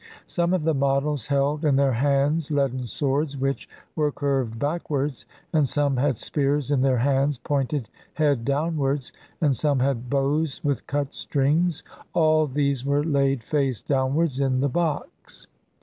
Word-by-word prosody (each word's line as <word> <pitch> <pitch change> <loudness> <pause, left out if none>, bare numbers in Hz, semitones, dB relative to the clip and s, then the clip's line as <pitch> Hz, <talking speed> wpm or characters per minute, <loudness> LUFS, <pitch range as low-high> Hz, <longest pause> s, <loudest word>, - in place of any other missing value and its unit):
Some 170 0 0
of 175 - -1
the 160 0 +2
models 140 -1 0
held 145 +2 0
in 145 -3 +3
their 135 0 +3
hands 140 +5 +1
leaden 135 -4 0
swords 140 +4 -1
which 135 +1 -2 0.3
were 150 -2 +1
curved 135 -6 -1
backwards, 145 -1 -2 0.3
and 150 -5 +3
some 145 -2 +1
had 135 -2 +1
spears 145 +1 0
in 140 -3 +2
their 130 -1 +3
hands 135 +2 +1
pointed 140 -2 -2 0.3
head 145 -6 +1
downwards, 140 -1 -1 0.3
and 145 -4 +3
some 145 +2 +1
had 125 -2 -1
bows 140 +2 0
with 140 -4 -1
cut 140 0 -2
strings; 150 +4 +1 0.3
all 155 -1 +3
these 140 -1 0
were 140 +1 +1
laid 140 -5 +1
face 135 -3 -1
downwards 135 +1 0
in 135 -2 +1
the 140 +2 +1
box. 155 0 -3
140 Hz, 150 wpm, -24 LUFS, 135-150 Hz, 0.3 s, in